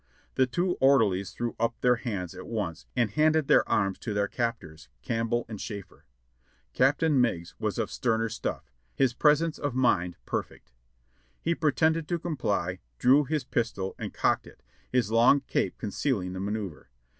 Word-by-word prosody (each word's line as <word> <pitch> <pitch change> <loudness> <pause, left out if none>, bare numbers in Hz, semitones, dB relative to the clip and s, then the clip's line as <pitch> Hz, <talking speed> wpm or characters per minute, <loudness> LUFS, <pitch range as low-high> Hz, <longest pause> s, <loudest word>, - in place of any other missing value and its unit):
The 130 - +3
two 175 +9 0
orderlies 105 -9 +4
threw 120 -1 -4
up 115 0 0
their 125 -1 +4
hands 100 -8 -4
at 95 - -9
once 100 -8 -4
and 120 -5 +1
handed 155 +4 +3
their - - +4
arms 95 -2 +1
to 105 -3 -4
their 100 0 +1
captors, 80 - -4
Campbell 115 - -1
and 110 -2 -7
Schafer. 100 -8 -8 0.7
Captain 140 - +3
INIeigs 85 -9 -1
was - - -2
of - - -2
sterner 115 -2 0
stuff, 115 - -5 0.2
his 130 -3 +2
presence 150 +4 +3
of 145 -4 -2
mind 90 -9 +2
per - - 0
fect. - - -20 0.7
He 170 - 0
pretended 160 0 +1
to 175 - 0
comply, 100 - -2 0.2
drew 140 - +5
his 150 +1 -1
pistol 110 -6 -2
and - - -4
cocked - - 0
it, - - -16 0.3
his 125 -4 +1
long 120 +5 +5
cape - - -1
concealing 100 -3 -2
the 95 - -5
manoeuvre. 100 -6 -4
115 Hz, 165 wpm, -28 LUFS, 100-140 Hz, 0.7 s, drew